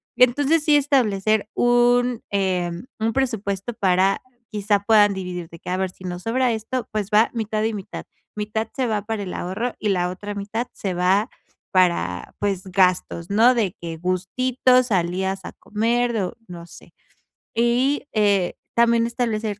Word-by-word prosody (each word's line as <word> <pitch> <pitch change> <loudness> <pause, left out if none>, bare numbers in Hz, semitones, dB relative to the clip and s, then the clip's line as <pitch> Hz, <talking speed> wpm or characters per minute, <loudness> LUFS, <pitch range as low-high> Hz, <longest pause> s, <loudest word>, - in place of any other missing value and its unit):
Entonces 285 +5 +3
sí, 300 -1 +4
establecer 220 -7 +1
un, 245 0 +3
em, 185 -1 -1
un 225 +1 +1
presupuesto 220 -4 -2
para 190 -1 +2 0.3
quizá 205 -1 +1
puedan 205 -2 +5
dividir, 180 -3 -5
de 165 - -12
que: - - -8
"A 185 - 0
ver, 190 0 -1
si 185 - -16
nos 180 0 -5
sobra 250 +2 +1
esto, 230 +3 -3
pues 210 -2 -2
va 215 +2 +5
mitad 215 -1 -2
y 220 0 0
mitad". 195 -2 -7 0.3
Mitad 215 +1 -2
se 260 -2 0
va 215 -2 0
para 210 0 -4
el 185 - -6
ahorro 215 +7 -3
y 210 - -1
la 180 -2 +1
otra 205 +3 -6
mitad 215 +4 -3
se 190 -3 -3
va 190 +6 +2 0.4
para 170 - +1
pues, 195 -2 -1
gastos, 180 -2 +1
¿no?, 230 +5 +5
de 210 -7 0
que 165 -1 -6
gustito, 250 +9 +2
salidas 190 -2 -1
a - - -7
comer 235 +3 0
o 190 -4 -2
no 170 -1 -9
sé. - - -15 0.6
Y, 250 +5 +1
eh, 200 -4 +2 0.2
también 235 0 +4
establecer 225 -3 -2
210 Hz, 160 wpm, -22 LUFS, 185-235 Hz, 0.6 s, puedan